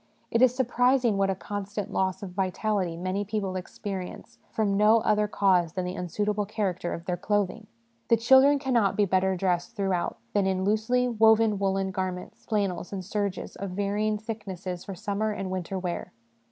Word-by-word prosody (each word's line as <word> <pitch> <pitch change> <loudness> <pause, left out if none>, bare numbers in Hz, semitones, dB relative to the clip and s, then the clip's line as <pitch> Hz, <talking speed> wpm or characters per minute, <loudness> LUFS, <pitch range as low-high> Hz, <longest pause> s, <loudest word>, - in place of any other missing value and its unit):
It 230 - +2
is 255 -1 +5
surprising 250 -2 +2
what 195 0 +2
a 190 - +1
constant 205 +1 -5
loss 190 0 0
of 190 - -6
vitality 190 -1 -1
many 185 +3 -2
people 200 -2 -3
experience 185 0 -6
from 205 -3 0
no 215 +2 +5
other 210 0 +2
cause 185 -5 +2
than 185 -1 -2
the 180 - -3
unsuitable 205 +3 -1
character 190 -5 -2
of 170 - -10
their 180 - -1
clothing. 205 +2 -1 0.4
The 230 - +5
children 265 +5 +6
cannot 245 -7 +1
be 205 - +3
better 190 0 +2
dressed 180 +3 -1
throughout 195 -4 -1 0.2
than 200 -2 +2
in 190 -1 0
loosely 220 +5 +2
woven 220 -2 +4
woollen 195 -1 0
garments, 185 -1 -5
flannels 200 -5 -1
and 190 -2 -5
serges, 200 -1 -3
of 200 - -5
varying 210 +1 0
thicknesses 195 -5 -6
for 195 - -6
summer 205 +2 -2
and 195 -2 -4
winter 185 +1 -3
wear. 180 -2 -4
200 Hz, 170 wpm, -27 LUFS, 185-215 Hz, 0.4 s, children